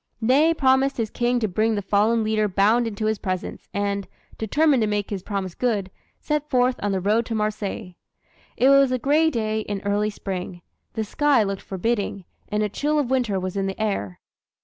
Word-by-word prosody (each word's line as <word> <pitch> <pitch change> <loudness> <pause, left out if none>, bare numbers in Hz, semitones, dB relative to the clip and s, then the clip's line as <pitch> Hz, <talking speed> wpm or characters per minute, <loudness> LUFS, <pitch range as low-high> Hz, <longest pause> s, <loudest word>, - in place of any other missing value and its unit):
Ney 270 +8 +4
promised 265 -1 +2
his 225 -3 -2
King 245 0 +1
to 220 - +1
bring 215 +4 +1
the 205 - -3
fallen 215 +4 +2
leader 215 -1 +1
bound 210 +5 +2
into 215 -1 -4
his 215 -1 0
presence, 185 -3 -4
and, 200 0 -2 0.3
determined 280 +4 +2
to 215 - +2
make 210 -1 -2
his 195 -2 -3
promise 190 -2 -4
good, 205 -6 -1 0.3
set 300 0 -2
forth 250 -1 +2
on 205 - 0
the 190 - 0
road 210 +5 +2
to 225 - -3
Marseilles. 210 -2 -3 0.6
It 260 - +4
was 275 -1 +5
a 255 - +1
gray 300 +6 +3
day 220 -5 -1
in 205 -2 -4
early 205 +1 +1
Spring. 185 -4 -6 0.3
The 220 - -2
sky 275 +2 +2
looked 195 -1 -3
forbidding, 200 -1 -2 0.2
and 210 0 0
a - - +1
chill 295 +9 -1
of 275 -4 0
winter 240 -7 +1
was 185 0 -4
in 195 -1 -1
the 195 - -5
air. 195 - -2
215 Hz, 195 wpm, -23 LUFS, 200-250 Hz, 0.6 s, was